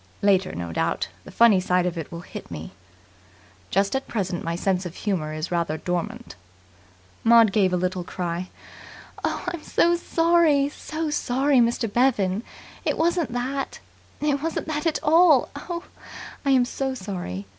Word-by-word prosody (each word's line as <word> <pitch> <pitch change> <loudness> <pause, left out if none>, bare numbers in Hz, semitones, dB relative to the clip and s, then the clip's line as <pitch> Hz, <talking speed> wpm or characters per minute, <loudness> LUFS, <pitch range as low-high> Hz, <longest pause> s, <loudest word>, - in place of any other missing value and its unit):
"Later, 195 -2 +3
no 85 -1 -5
doubt, - - -1 0.2
the - - -10
funny 230 -5 +5
side 180 -1 +1
of 180 -1 -1
it 165 -2 -6
will 170 0 -6
hit - - -9
me. - - -7 1.0
Just 195 +5 +1
at 265 - -2
present 185 -5 -2
my 165 0 -2
sense 185 +1 0
of 175 -1 -7
humour 180 -8 -2
is 155 +3 -4
rather 170 -2 0
dormant." 180 - -4 0.9
Maud 230 -2 +6
gave 195 -2 +3
a 180 - +1
little 180 0 -1
cry. 175 0 -4 0.7
"I'm 340 - -2
sorry! 335 -3 +3
I'm 280 - 0
so 310 +1 -4
sorry, 270 0 +2
Mr. 235 0 +2
Bevan. 210 -4 +2 0.4
It - - 0
wasn't 335 -3 +1
that. 265 +3 -3 0.4
It 290 -2 +1
wasn't 325 0 -3
that 300 +1 -1
at 315 - +1
all. 315 -3 +5
Oh, 340 +4 -5 0.6
I 280 - 0
am 260 -2 +5
so 265 +1 -3
sorry. 180 - -5
230 Hz, 155 wpm, -24 LUFS, 180-285 Hz, 1.0 s, Maud